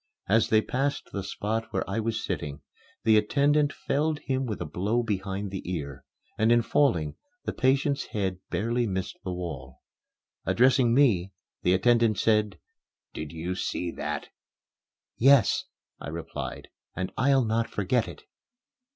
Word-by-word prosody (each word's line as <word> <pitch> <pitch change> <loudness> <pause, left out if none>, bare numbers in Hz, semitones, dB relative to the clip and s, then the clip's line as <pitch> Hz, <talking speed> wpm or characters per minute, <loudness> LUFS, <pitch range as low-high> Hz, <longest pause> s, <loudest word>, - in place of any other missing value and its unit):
As 110 +3 +3
they 110 0 +4
passed 140 +6 -2
the 100 - -3
spot 110 +3 -2
where - - -2
I 100 +3 -1
was 110 0 -2
sitting, 70 0 -4 0.4
the 110 -1 +5
attendant 145 +7 +3
felled 150 +3 -1
him 130 -2 -2
with 105 - -3
a - - -3
blow 105 +7 0
behind 100 -2 -3
the 95 - -4
ear; 70 -6 -5 0.3
and, 110 +2 +4
in 120 0 +5
falling, 85 - +1 0.3
the - - -2
patient's 135 +2 +1
head 95 -3 -2
barely 120 +2 0
missed 95 -2 -3
the 95 - -3
wall. 70 -8 -6 0.6
Addressing 125 -1 +4
me, 100 -9 +3 0.3
the 90 +1 +3
attendant 115 +1 +3
said, 105 -1 +2 0.6
"Did 75 -1 -6
you 85 +2 -3
see 90 -1 -2
that?" - - -4 0.9
"Yes," 135 -3 +5 0.3
I - - -7
replied, 80 +1 -6 0.3
"and 95 -1 -3
I'll 135 -1 +3
not 115 +1 0
forget 110 +4 0
it." - - -10
110 Hz, 145 wpm, -27 LUFS, 95-125 Hz, 0.9 s, the